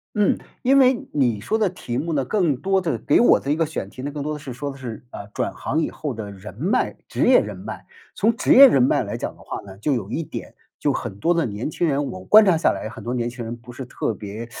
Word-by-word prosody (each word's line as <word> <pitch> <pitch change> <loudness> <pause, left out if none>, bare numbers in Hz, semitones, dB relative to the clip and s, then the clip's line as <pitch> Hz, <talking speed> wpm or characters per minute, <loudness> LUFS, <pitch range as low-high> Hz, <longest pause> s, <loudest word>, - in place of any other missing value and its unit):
嗯， 210 -2 +3 0.3
因 270 +2 +5
为 255 -2 +3
你 120 -7 +1
说 220 - 0
的 210 -3 +2
题 120 -9 -5
目 165 +5 -2
呢， 140 -3 0
更 170 -2 +1
多 190 +6 +1
的 170 -3 -1
给 - - +2
我 240 - +6
的 140 - -3
一 - - +3
个 165 +1 +1
选 150 -10 -5
题 130 - -10
呢， 145 +2 -4
更 145 -1 -5
多 150 +1 -2
的 150 - -6
是 140 -2 -8
说 140 +4 -4
的 135 - -11
是， 125 -4 -7
呃， 100 - -8
转 - - -2
行 155 - -2
以 - - -2
后 145 -4 -4
的 105 -3 -6
人 100 0 -10
脉 165 - 0
职 - - 0
业 - - +7
人 - - -6
脉。 - - -8 0.3
从 220 +2 +2
职 240 - +3
业 275 +1 +11
人 135 - +3
脉 125 - +3
来 - - -5
讲 - - -5
的 - - -19
话 - - -6
呢， 95 -1 -12
就 140 +8 0
有 115 -6 -3
一 165 - -2
点， - - -8 0.2
就 - - +1
很 95 - -5
多 170 +8 +2
的 165 - +1
年 105 +5 -4
轻 170 +2 -1
人 145 -1 0
我 95 -8 -7
观 215 +1 +8
察 185 -4 +4
下 160 - +3
来 - - -5
很 115 - -10
多 120 - -3
年 120 -1 -1
轻 120 -1 -7
人 115 +1 -5
不 120 +1 -13
是 130 +2 -7
特 120 - -3
别， 105 +3 -7
140 Hz, 305 characters per minute, -22 LUFS, 115-170 Hz, 0.3 s, 业